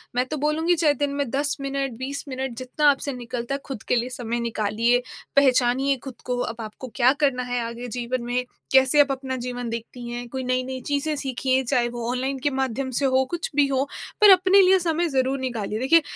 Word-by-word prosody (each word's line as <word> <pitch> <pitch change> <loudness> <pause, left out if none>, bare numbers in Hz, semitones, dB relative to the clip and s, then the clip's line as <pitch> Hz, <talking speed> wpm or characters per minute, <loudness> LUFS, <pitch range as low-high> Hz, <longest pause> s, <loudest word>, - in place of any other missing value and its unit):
मैं 250 +1 +2
तो 305 +3 -4
बोलूँगी 310 +4 +1
चाहे 310 -3 +3
दिन 285 0 -2
में 285 -3 -1
10 285 +2 0
मिनट, 275 -1 -2
20 270 +3 -4
मिनट 260 -2 -4
जितना 260 +4 +2
आपसे 280 0 0
निकलता 245 +1 -4
है - - -4
ख़ुद 265 -6 -6
के - - +2
लिए 240 +1 0
समय 240 -2 -3
निकालिए, 230 +1 +1 0.3
पहचानिए 265 0 +3
ख़ुद 265 -3 -9
को। 250 -1 -1
अब 230 -1 -3
आपको 220 +4 -8
क्या 255 0 +5
करना 255 -3 +2
है 245 0 -2
आगे 235 +1 -7
जीवन 245 +1 -2
में, 245 +1 -1 0.3
कैसे 265 +2 +6
आप 280 -1 +2
अपना 265 -1 -3
जीवन 245 -1 -4
देखती 235 +1 -6
हैं? 240 0 -5
कोई 260 +1 -4
नई-नई 255 +1 -2
चीज़ें 295 +2 0
सीखिए 265 -1 0
चाहे 245 -1 +1
वो 240 -1 -4
ऑनलाइन 265 +2 -2
के - - +5
माध्यम 265 0 -1
से 280 - +1
हो 260 0 +3
कुछ 345 -1 -3
भी 290 -1 +4
हो 270 -1 +1 0.4
पर 420 - +9
अपने 375 +1 +6
लिए 380 0 +5
समय 340 0 0
ज़रूर 265 -1 0
निकालिए। 230 -5 -3
देखिए, 325 +7 +5
260 Hz, 210 wpm, -24 LUFS, 245-280 Hz, 0.4 s, पर